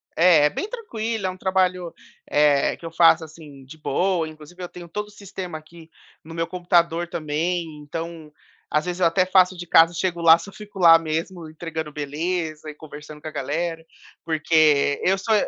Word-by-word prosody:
É, 165 -3 +5
é - - +4
bem 390 - -4
tranquilo, 230 - -4
é - - +1
um 185 - -7
trabalho, 185 -2 0 0.3
eh, 145 -1 +3
que - - -13
eu 165 - -6
faço, 165 0 +5
assim, 155 -3 -13
de 150 +4 -13
boa. 170 +3 0
Inclusive 155 +3 -13
eu 180 - -4
tenho 175 -1 -11
todo 210 +4 -4
o - - -16
sistema 190 -4 -7
aqui 160 +1 -15 0.3
no 165 +1 -11
meu 165 0 -2
computador 175 -1 +1
também, 170 +1 -2
então 160 +1 -7 0.4
às 150 +2 0
vezes 180 0 -4
eu - - +5
até 180 +2 +3
faço 185 0 +4
de 175 0 -8
casa, 165 +1 +5
chego 175 0 -2
lá, 165 0 +7
só 170 +4 -10
fico 205 -2 -11
lá 165 -2 +8
mesmo 165 +1 -4
entregando 160 -1 -6
beleza 155 +2 -3
e - - -7
conversando 150 0 -11
com - - -8
a - - -5
galera. 160 +4 -3 0.4
Porque 155 -3 +3
eu 190 +1 +3
sou 220 +3 -1
165 Hz, 190 wpm, -23 LUFS, 155-180 Hz, 0.4 s, lá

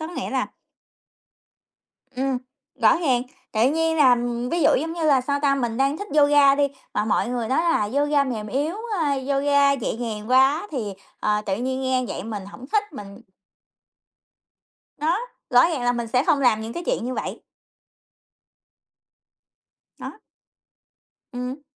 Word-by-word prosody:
có 315 - -4
nghĩa 350 - -5
là - - 0 1.7
Ừm, 265 0 0 0.4
rõ 220 - +6
ràng, 265 -8 +1 0.3
tự 230 +4 +3
nhiên 325 +1 0
là 260 -5 +6 0.3
ví 340 -2 0
dụ - - +5
giống 325 +2 -3
như 335 - -5
là, 280 -4 +4
sao 280 +2 -1
ta, 275 -1 +3
mình 240 -4 -2
đang 275 +3 +1
thích 410 - -6
yoga 285 -1 +6
đi, 285 0 +2 0.3
mà 210 - +1
mọi 220 - 0
người 240 -2 -2
nói 260 - +1
là 330 -12 +1
yoga 290 0 +2
mềm 225 -5 -4
yếu, 285 - -2 0.3
a, 290 -3 +1
yoga 280 +1 +2
nhẹ 255 -5 -3
nhàng 220 -1 -5
quá 270 +8 +4
thì, 220 -9 -4 0.3
ờ, 210 0 +1
tự 190 -1 0
nhiên 260 +2 -2
nghe 260 -1 0
vậy - - -5
mình 210 -3 -6
hổng 245 +5 -11
thích, 415 -4 0
mình 200 -5 -10 1.8
Đó, 320 +5 +1 0.3
rõ 245 - +6
ràng 310 -7 -3
là 245 - +3
mình 235 -1 -3
sẽ 250 +4 +1
không 290 -3 +2
làm 240 -4 +3
những 220 +1 -6
cái 345 - -5
chuyện - - -1
như 255 - -3
vậy. - - -5 2.6
Đó. - - -7 1.2
Ừm. 250 +3 -5
265 Hz, 165 wpm, -23 LUFS, 240-290 Hz, 2.6 s, rõ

